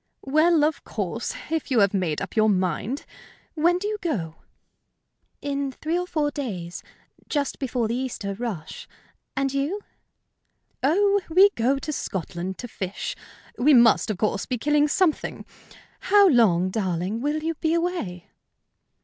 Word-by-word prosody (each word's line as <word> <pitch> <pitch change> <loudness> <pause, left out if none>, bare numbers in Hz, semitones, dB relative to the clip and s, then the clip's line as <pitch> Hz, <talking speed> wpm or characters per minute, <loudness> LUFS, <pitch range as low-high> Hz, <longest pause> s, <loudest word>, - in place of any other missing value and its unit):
"Well, 310 +3 +4
of 305 0 0
course, 210 +2 -3 0.2
if 320 -2 -1
you 250 -4 +3
have 200 0 +3
made 175 -6 -1
up - - -8
your 215 -1 +4
mind. 190 - -1 0.5
When 345 +3 +3
do 405 +3 -3
you 425 0 -3
go?" 170 - -3 1.1
"In 280 -1 -2
three 320 +6 -3
or 360 0 -1
four 300 -4 0
days 185 -12 -5 0.5
just 285 -2 -1
before 245 -4 -1
the 225 - -2
Easter 240 -5 -3
rush. 195 -7 -6 0.5
And 275 0 0
you?" 290 +9 -1 1.0
"Oh, 400 +8 +3
we 380 +5 +6
go 260 - +1
to 305 +2 -4
Scotland 185 - -4
to 245 - -6
fish. 195 -4 -5 0.4
We 285 +3 +6
must, 235 -2 +5
of 210 - -1
course, 215 - -1
be 250 - -1
killing 295 +4 +3
something. 325 +1 0 0.5
How 405 0 +5
long, 185 - +4
darling, 190 +2 -2
will 300 +3 -1
you 330 +1 0
be 320 +1 0
away?" 335 - -3
265 Hz, 150 wpm, -25 LUFS, 200-315 Hz, 1.1 s, we